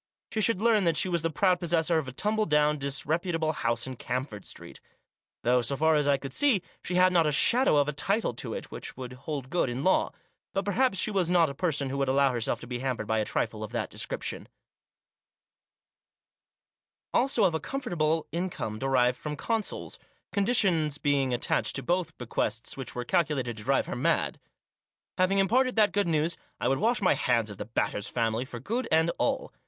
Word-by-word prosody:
She 220 - -1
should 215 -1 +2
learn 220 -4 +4
that 165 -2 +2
she - - +2
was 170 -3 0
the 165 - 0
proud 180 +3 +2
possessor 165 -1 +2
of 145 - -5
a - - -5
tumble 215 +10 0
down, 150 -1 +3
disreputable 155 +4 -1
house 115 -4 -1
in 130 -1 -7
Camford 125 -5 -4
Street; - - -8 0.6
though, 125 +1 +3
so 135 +4 -1
far 160 +2 +3
as 150 -2 +2
I 140 -1 +4
could 135 -1 -8
see, 270 -10 +3 0.2
she 180 - -3
had 185 0 +5
not 165 -3 +4
a - - +2
shadow 235 - +4
of 145 0 +3
a 150 - -1
title 200 - 0
to - - -5
it - - -7
which - - -7
would 125 -1 -7
hold 135 0 -6
good 175 -7 +1
in 125 +3 -3
law; 190 - +2 0.4
but 195 0 0
perhaps 215 +1 +1
she 215 - +1
was 190 -4 +1
not 170 -4 +4
a - - -7
person 140 -4 0
who 140 - -3
would 135 - +1
allow 135 +1 +3
herself 120 -3 -1
to - - -7
be 120 0 -4
hampered 130 -4 -2
by 110 +1 0
a 105 - 0
trifle 110 -1 -2
of 110 - -6
that 120 - -2
description; - - -4 2.7
also 250 -3 +3
of 180 -4 +3
a 160 - 0
comfortable 165 - -1
income 170 -11 -3
derived 125 -1 +2
from 150 -1 -4
consols 225 +6 -3 0.2
— - - -41
conditions 190 - +2
being 140 -3 +1
attached 115 -3 0
to 135 - -2
both 175 -2 -1
bequests 115 -1 -2
which 135 -2 -7
were 125 0 -3
calculated 135 -8 0
to 105 - -6
drive 135 +3 +2
her - - -5
mad. 125 - 0 0.8
Having 185 +2 +3
imparted 250 +7 +2
that 210 -3 +4
good 205 -2 +1
news, 165 +1 +1 0.2
I - - 0
would 135 +1 +1
wash 230 +2 +1
my 185 - +5
hands 115 -4 +1
of 100 - -11
the - - -4
Batters' 105 -2 -2
family 115 +1 -1
for 120 -2 -8
good 230 - -2
and 160 +1 +3
all. - - -1
150 Hz, 205 wpm, -28 LUFS, 125-185 Hz, 2.7 s, had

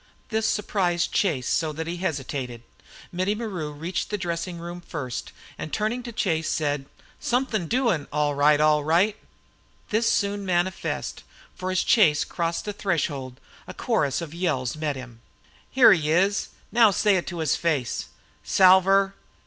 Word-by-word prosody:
This 220 -1 0
surprised 180 -5 0
Chase 145 - 0
so 160 -2 +1
that 160 +2 -4
he 170 +2 -4
hesitated. 135 -8 -4 0.5
Mittie 185 +4 0
Maru 190 -9 -4
reached 165 +5 -4
the 210 - -1
dressing 170 -1 -3
room 175 +1 -7
first 145 -8 -5 0.3
and 155 - -5
turning 220 +4 -1
to 240 -1 -7
Chase 165 -7 -1
he - - 0
said; 145 -3 -1 0.3
"Somethin' 240 -7 0
doin', 225 - +1
all 150 0 +1
right, 145 +1 +4
all 150 -1 +4
right!" 175 +7 +3 0.8
This 225 +2 +2
was - - +4
soon 200 0 0
manifest, 180 -1 -2 0.3
for 185 0 -5
as 185 -1 +1
Chase 160 -10 +4
crossed 170 -1 -3
the 210 - -3
threshold 145 -10 -2 0.3
a - - -8
chorus 140 +1 0
of 165 -2 -7
yells 155 -8 -1
met 155 -2 -2
him. 125 -3 -10 0.5
"Here 260 -5 +7
he 155 -4 -1
is 195 +5 +2 0.2
now 230 -2 +6
say 205 0 +3
it 175 - -3
to 175 - -5
his 160 -4 +1
face!" 150 -8 -1 0.4
"Salver!" 195 +1 +5
170 Hz, 160 wpm, -25 LUFS, 150-195 Hz, 0.8 s, Here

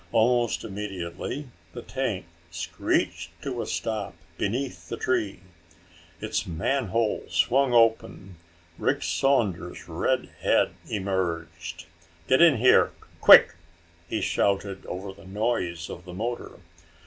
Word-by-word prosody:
Almost 120 +1 +2
immediately 100 - -5 0.3
the 120 - -7
tank 120 -9 -3 0.2
screeched 85 0 -2
to 125 -4 -3
a - - -5
stop 110 -5 -3 0.2
beneath 125 +9 -3
the - - -4
tree. 100 -8 -1 0.8
Its - - -2
manhole 110 +5 0
swung 135 0 +2
open. 110 -5 +2 0.4
Rick - - 0
Saunders' 105 -11 0
red - - -1
head - - +3 0.2
emerged. 85 -4 -3 0.4
"Get 130 - +4
in 165 -6 +7
here! 125 +3 +5 0.3
Quick!" - - +9 0.6
he - - -1
shouted 100 -1 0
over 95 +2 -6
the 100 -1 -15
noise 95 -5 -2
of 85 - -8
the 90 -1 -9
motor. 120 +4 -4
100 Hz, 110 wpm, -26 LUFS, 90-120 Hz, 0.8 s, Quick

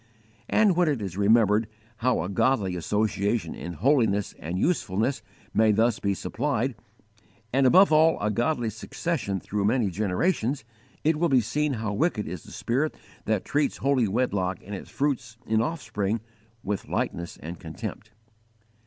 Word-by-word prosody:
And 210 -4 +4
when 175 -1 +3
it 145 -5 +1
is 95 -4 -5
remembered 105 +1 +4 0.3
how 125 -8 +1
a - - -3
godly 100 -1 +1
association 105 +1 0
in 85 - -6
holiness 110 - +2
and 85 +4 -4
usefulness 115 - 0 0.3
may 110 -1 +4
thus 115 +2 +2
be 100 -1 0
supplied, 130 +6 -1 0.8
and 135 0 +4
above 185 +7 +6
all 160 +1 +5
a 105 +1 0
godly 120 +1 0
succession 110 - -3
through 100 +2 -2
many 110 -2 +2
generations, 110 - 0 0.4
it 155 0 +3
will 170 - +2
be 130 -2 +5
seen 145 +6 0
how 110 -3 -2
wicked 120 -3 0
is 85 0 -6
the - - -12
spirit 135 +6 -1 0.3
that 110 -3 0
treats 145 0 0
holy 135 -4 +2
wedlock 100 -5 0
and 105 - -7
its 100 - -7
fruits 125 -5 -2
in 110 0 +2
offspring, 115 -7 -2 0.4
with 100 0 -3
lightness 85 0 -3
and 85 +3 -8
contempt. 80 +6 -7
110 Hz, 155 wpm, -26 LUFS, 100-135 Hz, 0.8 s, above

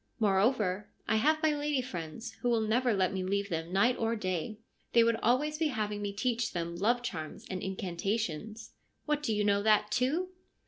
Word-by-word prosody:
Moreover, 205 -1 +2 0.2
I 220 - +3
have 310 +7 +2
my 315 - +4
lady 290 -3 0
friends, 180 +2 -6
who 245 - +1
will 230 -2 +3
never 235 +3 +2
let 190 -3 +1
me 190 -1 -2
leave 200 +2 -1
them 165 +1 -3
night 235 +7 +3
or 225 0 +1
day. 185 0 -3 0.4
They 235 - +7
would 230 0 +2
always 290 +7 +1
be 320 - +3
having 210 -6 -2
me 205 -1 -2
teach 230 +2 -1
them 170 -1 -3
love 235 +7 +1
charms 160 -9 -5
and 185 -1 -3
incantations/ 195 +2 -3 0.2
' - - -46
What, 300 -1 0
do 295 - -1
you 210 -1 +1
know 200 -1 +3
that, 210 0 +3
too 285 +10 +1
215 Hz, 195 wpm, -31 LUFS, 190-245 Hz, 0.4 s, They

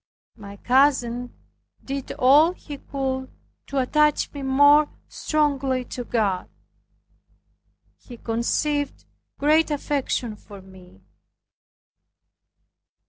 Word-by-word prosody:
My 200 -2 -11
cousin 245 -1 +1 0.5
did 275 -1 -5
all 295 +7 +5
he 290 -5 -10
could 265 -1 -4 0.4
to 280 - -5
attach 300 +3 +2
me 285 - -7
more 285 +3 +5 0.2
strongly 275 -4 -1
to 245 - -4
God. 205 -6 -1 1.5
He 240 - -12
conceived 280 +6 -2 0.3
great 310 +3 +3
affection 280 -6 -2
for 205 -1 -13
me. 185 - -17
265 Hz, 85 wpm, -23 LUFS, 235-290 Hz, 1.5 s, all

